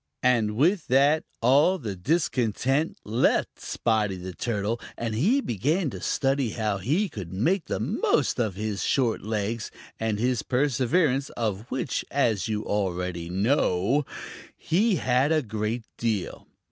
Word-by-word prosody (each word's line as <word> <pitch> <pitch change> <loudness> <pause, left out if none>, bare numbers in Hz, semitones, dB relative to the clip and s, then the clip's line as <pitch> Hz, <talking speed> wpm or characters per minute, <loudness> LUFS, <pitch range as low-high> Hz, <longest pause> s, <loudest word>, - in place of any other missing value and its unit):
And 115 -4 +2
with 170 - +2
that, 140 +4 +4 0.2
all 145 +10 +5
the 110 - -5
discontent 135 - 0
left 110 +4 +1
Spotty 110 -4 0
the 90 0 -7
Turtle, 110 +2 -2 0.2
and 115 -1 -3
he 205 - +2
began 145 - 0
to - - -8
study 135 -4 0
how 105 -3 -1
he 155 - +1
could 100 - -8
make 160 - +1
the - - -3
most - - +1
of 110 -6 0
his 105 0 -3
short 125 -5 +1
legs 110 +1 -2 0.3
and 110 -2 0
his 125 +1 +1
perseverance, 135 +2 +1
of 110 0 -2
which, 130 0 -2
as 115 -9 +1
you 105 -1 -2
already 90 -4 -2
know, 100 +4 +2 0.5
he 205 +5 +2
had 130 -1 +2
a 155 -2 +2
great 110 +1 -3 0.2
deal. 110 -5 -2
115 Hz, 140 wpm, -26 LUFS, 105-140 Hz, 0.5 s, all